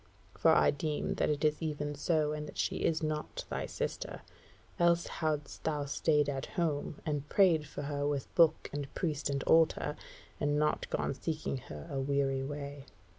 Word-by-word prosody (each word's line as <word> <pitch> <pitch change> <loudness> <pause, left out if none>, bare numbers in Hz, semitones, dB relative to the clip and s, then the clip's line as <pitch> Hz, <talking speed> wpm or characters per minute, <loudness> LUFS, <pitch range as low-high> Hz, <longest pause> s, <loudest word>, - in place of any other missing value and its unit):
For - - +4
I - - +5
deem 150 +1 -2
that - - +2
it 150 0 +1
is 150 +1 +2
even 150 -2 -2
so, 150 +1 +1
and 150 0 -4
that - - -10
she - - 0
is 160 -1 +1
not 155 0 -3
thy - - -2
sister, - - -4 0.6
else 170 0 +4
hadst 150 -3 -3
thou 150 -2 0
stayed 150 +1 +2
at 135 -1 -2
home, 155 -4 -1
and 150 -2 -2
prayed 165 -7 +4
for 145 - -6
her 145 0 -1
with 145 -2 -2
book 165 -2 +4
and 145 -1 -4
priest 150 -5 -1
and 140 -1 -1
altar, 160 -2 +3 0.4
and 145 0 +1
not 150 0 +1
gone - - -1
seeking 155 -1 -3
her 75 - -9
a 135 - -1
weary 135 0 +1
way." 140 0 -6
150 Hz, 175 wpm, -32 LUFS, 140-155 Hz, 0.6 s, I